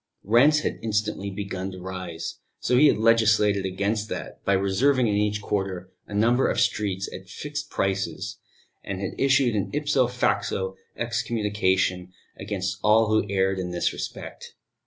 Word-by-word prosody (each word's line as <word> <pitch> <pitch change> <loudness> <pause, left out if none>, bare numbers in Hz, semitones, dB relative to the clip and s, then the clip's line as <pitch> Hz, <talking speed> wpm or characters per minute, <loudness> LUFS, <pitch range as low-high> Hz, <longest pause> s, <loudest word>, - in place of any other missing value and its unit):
Rents 140 +9 +5
had - - -3
instantly 105 -2 -1
begun 95 -1 -4
to 95 - -8
rise, 90 -3 -6 0.2
so 125 - +1
he 145 +4 +7
had - - +3
legislated 110 -3 +3
against 100 +3 -1
that - - -6
by 100 - +2
reserving 120 +8 +2
in 105 - +1
each 105 0 0
quarter 95 -3 -3 0.2
a 105 - -7
number 120 +5 +3
of - - 0
streets 100 -2 0
at 95 +1 -9
fixed 145 +8 -5
prices, 95 -4 -2 0.4
and 100 -1 -4
had 95 - -3
issued 135 -3 +3
an 100 -1 -1
ipso 145 -4 +2
facto 95 -6 -1 0.2
excommunication 105 -6 0 0.2
against 95 -1 -3
all 110 +1 +4
who 110 -1 +2
erred 95 -1 +1
in 90 -1 -3
this 90 -1 0
respect. - - -7
100 Hz, 155 wpm, -25 LUFS, 95-115 Hz, 0.4 s, he